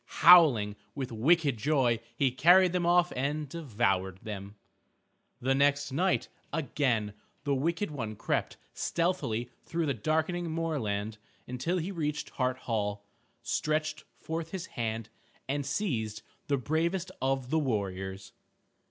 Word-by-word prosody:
Howling 125 -13 +7 0.2
with 130 -3 -4
wicked 140 +3 +3
joy 125 -2 +2 0.2
he 135 +1 +2
carried 175 +7 +6
them 175 -1 +1
off 175 0 +4
and 145 +3 -1
devoured 105 - -1
them. 100 -1 -7 0.8
The 130 +2 +1
next 140 +1 +2
night, 180 +7 +1 0.2
again 125 -8 0 0.3
the 145 - +1
wicked 165 +7 0
one 115 -7 -4
crept - - -2 0.2
stealthily 150 -10 -1
through 165 0 -2
the 140 - +1
darkening 160 - -1
moorland 110 -11 -2 0.3
until 145 +9 -1
he 180 +3 -2
reached 150 -4 -3
Hart 130 -1 0
Hall, 105 -4 -2 0.4
stretched 155 0 -1
forth 160 0 -4
his 185 0 -5
hand, 115 - -4 0.4
and 145 +1 -1
seized 120 - -2 0.2
the 140 - +2
bravest 170 +7 -1
of 135 -1 0
the 160 - +3
warriors. 95 -7 -3
140 Hz, 125 wpm, -30 LUFS, 110-165 Hz, 0.8 s, Howling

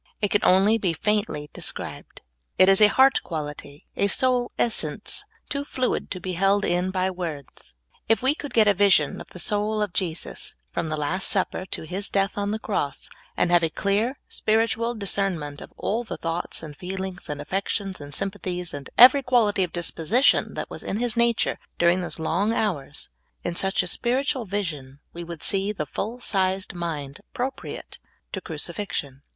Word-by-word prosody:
It 205 -2 0
can 205 - +3
only 200 +5 +5
be 180 -5 +1
faintly 200 -5 -1
described. - - -5 0.4
It 185 - +7
is 195 +1 +6
a 210 - +10
heart 265 +3 +5
quality, 150 -2 -6
a 200 - +2
soul 250 +3 +2
essence, 215 - -1 0.2
too 280 0 -2
fluid 255 -3 -1
to 185 - -4
be 185 +1 -4
held 195 +3 +3
in 180 +1 +1
by 185 0 0
words. 160 - -7 0.3
If 225 +1 +3
we 265 +2 +4
could 290 -3 -7
get 220 -3 +5
a 205 - +6
vision 190 -7 +3
of - - -10
the - - -12
soul 210 +4 0
of 210 -4 -1
Jesus, 170 -4 -2 0.2
from 165 - -2
the 155 - -1
Last 160 +6 0
Supper 190 -1 0
to - - -3
His 185 +5 -3
death 195 -1 +1
on 205 0 -1
the 215 - 0
cross, 150 -11 -2 0.3
and 175 - +2
have 175 -1 +6
a 165 - +2
clear, 210 - 0
spiritual 225 +2 +1
discernment 190 -8 -2
of - - -10
all 230 +4 -1
the 225 - -6
thoughts 165 0 -3
and 150 -2 -8
feel 190 +4 -5
ings 190 0 -7
and 145 -1 -3
affections 195 +3 -2
and 145 0 -7
sympathies, 185 -3 -3
and 140 -1 -7
every 255 +3 +9
quality 235 -6 +3
of 180 -3 0
disposition 175 - +2
that - - -5
was - - -6
in 200 - -2
His 240 0 0
nature 235 -1 +2 0.2
during 175 +2 +3
those 175 - -3
long 180 +7 +1
hours, 155 -11 -2 0.3
in 175 - -2
such 195 +2 +1
a - - -5
spiritual 255 +5 0
vision 155 -9 -4
we 170 - -6
would 170 -2 -7
see 195 +1 +1
the 175 -8 -3
full 220 - -4
sized 190 -2 0
niind 155 -5 -4
appropriate 260 +2 -5 0.3
to - - -4
crucifixion. 145 - -3
190 Hz, 180 wpm, -25 LUFS, 170-215 Hz, 0.4 s, a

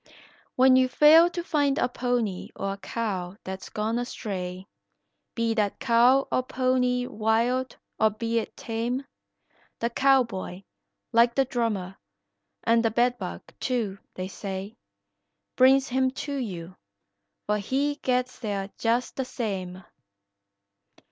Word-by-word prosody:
When 260 0 +6
you 260 0 +5
fail 315 +5 +7
to 345 0 -4
find 290 -4 +1
a 245 - +2
pony 245 -6 -2
or 195 0 -2
a - - -8
cow 195 -4 -4
that's 190 0 -7
gone 220 +2 -1
a 245 - -2
stray, 185 -5 -5 0.7
Be 230 -1 +1
that 210 -3 0
cow 255 +2 +4
or - - +2
pony 255 -1 +1
wild 235 +3 0 0.2
or 220 - +5
be 230 +2 -1
it 220 - -7
tame, 240 +4 -3 0.7
The 235 +1 -1
cowboy, 235 -9 +1 0.5
like 235 +1 +4
the 270 - +3
drummer, 215 -7 -2 0.7
and 230 0 +3
the 225 - +3
bed 245 +2 +1
bug, - - -6 0.2
too, 225 -7 -2 0.2
they 185 0 -4
say, 195 +1 -6 0.8
Brings 265 +1 +5
him 260 +1 +2 0.2
to 285 - -4
you, 185 -9 -5 0.7
for 210 0 0
he 280 +7 -1
gets 255 0 0
there 200 -3 -3
just 235 +2 0
the 265 - -1
same. 190 -7 -4
235 Hz, 135 wpm, -26 LUFS, 205-255 Hz, 0.8 s, fail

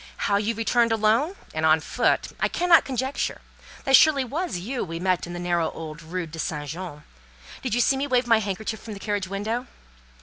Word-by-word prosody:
How 200 - +3
you 215 +3 -1
returned 230 +1 +2
alone, 225 - +2 0.2
and 155 - -2
on 160 0 +5
foot, - - 0
I - - +2
cannot 350 -1 +4
conjecture. 265 +1 -2 0.4
That 270 - +6
surely 290 -2 +6
was 305 - -3
you 235 +9 -3
we 165 -1 -5
met 185 -1 0
in 175 - -7
the 175 - -5
narrow 175 -2 0
old 160 0 -8
Rue 170 +2 -4
St. 150 -2 -3
Jean? 160 -1 -7 0.6
Did 250 -4 -1
you 245 - +3
see 270 - +3
me 280 +2 -1
wave 250 -2 +2
my 230 -2 +4
handkerchief 215 +1 -3
from 220 -2 -7
the - - -9
carriage 205 -2 -2
window? 220 +6 -3
215 Hz, 200 wpm, -25 LUFS, 175-250 Hz, 0.6 s, That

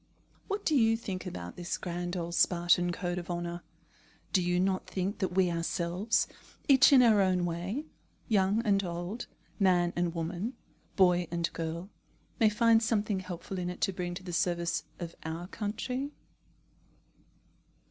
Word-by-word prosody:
What 405 0 -3
do 310 - +3
you 225 -3 +4
think 190 -4 -5
about 90 - -6
this 175 0 -3
grand 175 0 -4
old 170 0 -3
Spartan 175 0 +3
code 175 0 -2
of 175 - -9
honour? 175 0 -3 0.7
Do 185 - +4
you 175 0 +1
not 185 0 0
think 190 +2 -2
that 185 -3 -1
we 185 -2 +3
ourselves, 170 +5 0 0.4
each 275 -1 +7
in 260 -3 +8
our 220 -4 +5
own 185 -2 +2
way, 180 - -3 0.4
young 205 0 +2
and 200 -2 +3
old, 175 +6 -4 0.3
man 180 -3 +3
and 175 -1 0
woman, 175 +9 -3 0.4
boy 180 -2 +4
and 170 0 0
girl, 170 +4 -4 0.5
may 220 - +6
find 225 +1 +4
something 215 -3 0
helpful 185 +1 -6
in 180 0 -2
it 180 - -6
to 195 - +1
bring 175 -1 -3
to 185 - -7
the 180 -1 -6
service 170 -2 0
of 170 -1 -5
our 160 +2 -4
country? 250 +7 -3
180 Hz, 155 wpm, -30 LUFS, 175-205 Hz, 0.7 s, in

